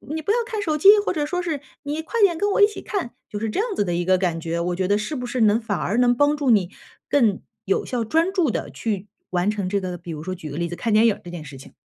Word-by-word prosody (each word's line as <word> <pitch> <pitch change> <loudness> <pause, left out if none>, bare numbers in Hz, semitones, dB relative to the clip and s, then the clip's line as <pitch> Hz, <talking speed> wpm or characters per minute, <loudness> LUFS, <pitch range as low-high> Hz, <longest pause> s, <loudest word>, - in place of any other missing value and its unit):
你 320 - -3
不 360 - 0
要 455 - +3
看 445 -3 -3
手 310 -6 0
机”， 305 - +3 0.2
或 - - +1
者 300 -4 -1
说 360 +4 -2
是” 325 -5 -2 0.2
你 295 +2 -3
快 455 +8 -2
点 370 -5 +4
跟 410 +3 +1
我 395 - +2
一 - - +10
起 420 - -8
看”， 370 - -4 0.2
就 210 - -5
是 220 +1 -2
这 215 - -2
样 430 -1 -1
子 - - +1
的 175 - -1
一 175 +1 -1
个 185 +1 +4
感 175 -3 -1
觉。 165 +1 -3
我 175 +1 -1
觉 185 -1 0
得 205 +1 +3
是 215 +9 -3
不 250 - -4
是 245 0 -2
能 215 0 +4
反 210 -4 -2
而 205 - -1
能 245 0 +4
帮 290 +3 +3
助 285 -3 0
你 200 -6 +3 0.4
更 225 -9 +2 0.2
有 195 - 0
效、 245 -2 -2
专 325 - +2
注 355 -7 +2
地 210 - -3
去 200 - -3 0.2
完 180 +3 +1
成 205 -3 -3
这 200 +1 0
个， 180 -1 -4
比 170 - -9
如 155 -1 -6
说 185 +2 -4
举 170 -4 -8
个 145 - -6
例 170 0 -1
子， 175 - -5
看 230 - -1
电 215 +2 +5
影 210 - +1
这 175 - -9
件 170 -2 -7
事 140 -2 -10
情。 130 - -14
220 Hz, 335 characters per minute, -23 LUFS, -, 0.4 s, 一